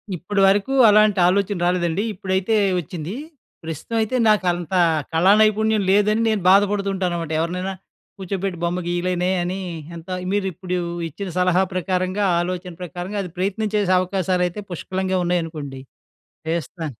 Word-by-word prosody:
ఇప్పడి 195 +4 -1
వరకు 205 +7 +2 0.2
అలాంటి 210 -1 +4
ఆలోచన 200 +1 +1
రాలేదండి, 175 +2 0
ఇప్పుడైతే 190 +3 -1 0.2
వచ్చింది. 170 +4 -6 0.5
ప్రస్తుతం 160 +8 -4
అయితే, 220 +4 -1
నాకంత 175 -4 +1 0.4
కళానైపుణ్యం 215 +4 +4
లేదని 210 +3 +3
నేను 215 -2 0
బాధపడుతూ 200 0 +3
ఉంటాననమాట. 175 -4 -2
ఎవరినైనా 180 +3 -2 0.5
కూర్చోబెట్టి 190 -1 -3
బొమ్మ 175 +1 0
గీయలేనే 180 +1 0
అని, 185 +2 -3 0.4
ఎంత 165 +3 -11 0.2
మీరిప్పుడు 185 -2 -2 0.3
ఇచ్చిన 195 +5 -6
సలహా 180 +1 +3
ప్రకారంగా, 185 +2 -1 0.2
ఆలోచన 180 0 -4
ప్రకారంగా, 180 +3 -5
అది 180 - -8
ప్రయత్నం 200 +3 -1
చేసే 205 -3 +1
అవకాశాలయితే 185 +1 -1
పుష్కలంగా 185 +2 -2
ఉన్నాయనుకోండి, 155 -6 -3 0.7
చేస్తా. 165 +1 -3
185 Hz, 120 wpm, -21 LUFS, 175-200 Hz, 0.7 s, అలాంటి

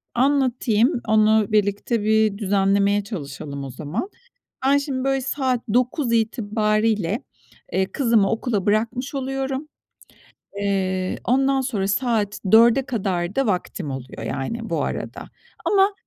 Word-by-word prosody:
Anlatayım. 250 -2 +2
Onu 215 -1 +3
birlikte 205 +2 +1
bir 215 -1 +2
düzenlemeye 200 0 +2
çalışalım 140 -7 -6
o 135 - -6
zaman. 155 - -4 0.6
Ben 280 +1 +5
şimdi, 270 -2 -3
böyle, 270 0 +1
saat 260 -2 -1
9 250 0 +1
itibarıyla, 215 - +1 0.5
eee, 190 +1 0
kızımı 230 -7 +2
okula 225 -4 -1
bırakmış 230 +6 0
oluyorum. 270 +2 -3 0.9
Eee, 190 -2 -1
ondan 270 +2 +2
sonra 215 -7 -1
saat 210 -1 0
4'e 235 +4 +6
kadar 190 -6 -2
da 270 -1 +2
vaktim 180 -6 -2
oluyor, 130 -1 -7
yani, 225 - -4
bu - - 0
arada. - - -5 0.4
Ama 395 0 +3
220 Hz, 120 wpm, -22 LUFS, 200-260 Hz, 0.9 s, 4'e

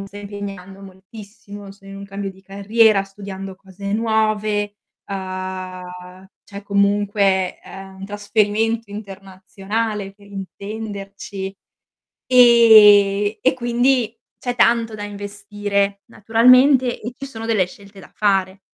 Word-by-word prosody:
mi 195 - -7
sto 200 - -13
impegnando 200 -2 -8
moltissimo, 200 +1 -12
sono 195 0 -16
in 195 - -9
un 200 - -8
cambio 195 0 -5
di 190 0 -18
carriera, 200 +1 +2
studiando 195 -1 -9
cose 195 +1 -8
nuove, 215 -2 0 0.3
uhm, 185 -1 -7 0.2
cioè 200 0 -10
comunque, 200 -1 +1
ehm, 195 0 -11
un 195 - -6
trasferimento 210 +2 -1
internazionale 195 +1 -5
per 200 0 -20
intenderci 200 0 -7 0.8
ehm, 215 -4 +6
e 260 - +3
quindi 240 -1 +1 0.2
c'è 245 -1 -3
tanto 230 -2 +2
da 205 - -7
investire 205 0 -3
naturalmente 250 +4 +4
e 235 +3 -5
ci 275 - -7
sono 225 -4 -8
delle 210 -5 +2
scelte 200 +1 -15
da - - -15
fare. 195 -2 0
205 Hz, 120 wpm, -20 LUFS, 195-220 Hz, 0.8 s, ehm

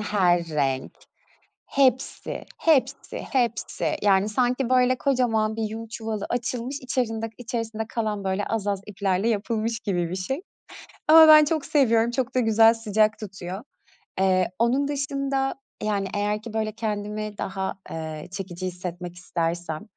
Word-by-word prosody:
her 180 -5 +2
renk, 135 -4 -1 0.7
hepsi, 260 -2 0
hepsi, 275 -4 +1
hepsi, 240 -4 -1
yani, 200 0 +3
sanki, 250 +3 +1
böyle, 255 0 +4
kocaman 230 -5 +1
bir 225 - -2
yün 225 +1 -4
çuvalı 220 -2 -4
açılmış, 245 +2 -2
içerinde 225 -3 -2
içersinde 225 -2 -4
kalan 215 -4 -2
böyle 190 +1 -1
az 220 -3 -2
az 200 -1 0
iplerle 195 0 0
yapılmış 225 +1 -1
gibi 175 -7 -1
bir 185 - -3
şey. 265 - -3 0.7
Ama 315 +1 +9
ben 305 -1 +9
çok 310 -2 -1
seviyorum, 235 -5 +3
çok 255 +1 -2
da - - +4
güzel 225 -1 +5
sıcak 215 -1 +1
tutuyor. 190 0 -7 0.6
Eee, 185 -1 +3
onun 260 +5 +2
dışında, 275 -1 -1 0.3
yani, 205 -2 0
eğer 210 +1 -1
ki 230 -1 -8
böyle, 220 -1 -1
kendimi 210 -1 -4
daha, 190 0 -3 0.2
eee, 155 -1 -6
çekici 185 -1 -5
hissetmek 180 -1 -6
istersem 170 -2 -3
220 Hz, 140 wpm, -25 LUFS, 195-245 Hz, 0.7 s, Ama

